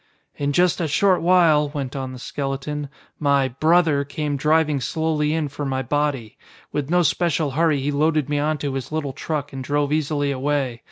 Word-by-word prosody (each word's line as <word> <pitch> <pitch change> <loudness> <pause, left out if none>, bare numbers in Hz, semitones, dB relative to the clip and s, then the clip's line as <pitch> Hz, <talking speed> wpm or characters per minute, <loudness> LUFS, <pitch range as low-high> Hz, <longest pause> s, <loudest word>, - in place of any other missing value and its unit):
"In 145 0 -1
just 175 +3 +2
a 165 - 0
short 185 +5 +3
while," 165 -4 +4
went 140 -3 -5
on 130 -1 -4
the 130 - -8
skeleton, 140 +2 -4 0.3
"my 140 -2 +2
'brother' 155 +1 +3
came 145 +1 -3
driving 150 0 +2
slowly 155 +2 0
in 160 -1 0
for 145 +1 -6
my 130 -1 -1
body. 135 -4 -2 0.3
With 145 -1 -3
no 175 +1 +3
special 155 0 +1
hurry 155 0 +2
he 145 +2 -1
loaded 150 0 +1
me 145 -1 0
onto 150 -1 -1
his 135 0 -5
little 150 -3 -2
truck 145 0 -4
and 135 -1 -5
drove 145 +1 0
easily 145 -2 0
away. 135 -3 -1
145 Hz, 180 wpm, -22 LUFS, 140-155 Hz, 0.3 s, while